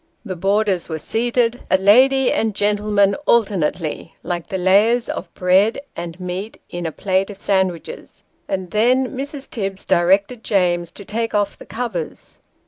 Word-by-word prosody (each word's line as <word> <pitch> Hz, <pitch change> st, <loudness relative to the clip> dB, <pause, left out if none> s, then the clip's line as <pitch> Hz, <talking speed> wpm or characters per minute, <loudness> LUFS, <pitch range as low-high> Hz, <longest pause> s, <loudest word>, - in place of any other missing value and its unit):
The 190 Hz, -3 st, -4 dB
boarders 195 Hz, 0 st, 0 dB
were 160 Hz, -, -3 dB
seated, 235 Hz, +6 st, 0 dB
a 190 Hz, -, +4 dB
lady 255 Hz, +7 st, +5 dB
and 220 Hz, -2 st, 0 dB
gentleman 205 Hz, -1 st, +2 dB
alternately, 180 Hz, -8 st, 0 dB
like 175 Hz, -1 st, -4 dB
the 195 Hz, -, -3 dB
layers 210 Hz, +6 st, +3 dB
of 170 Hz, -, -5 dB
bread 190 Hz, +4 st, +3 dB, 0.2 s
and 170 Hz, +1 st, -6 dB
meat 185 Hz, +4 st, -5 dB
in 175 Hz, -1 st, -3 dB
a -, -, -4 dB
plate 190 Hz, +3 st, 0 dB
of 205 Hz, -, -9 dB
sandwiches; 190 Hz, -4 st, -2 dB, 0.2 s
and 185 Hz, -2 st, -3 dB
then 250 Hz, +5 st, +2 dB
Mrs. 275 Hz, +1 st, -5 dB
Tibbs 195 Hz, -3 st, -4 dB
directed 195 Hz, +6 st, +2 dB
James 175 Hz, -4 st, +1 dB
to 200 Hz, -, -11 dB
take 225 Hz, +2 st, -2 dB
off 205 Hz, -1 st, 0 dB
the -, -, -14 dB
covers. 220 Hz, -9 st, -5 dB
200 Hz, 150 wpm, -20 LUFS, 180-225 Hz, 0.2 s, lady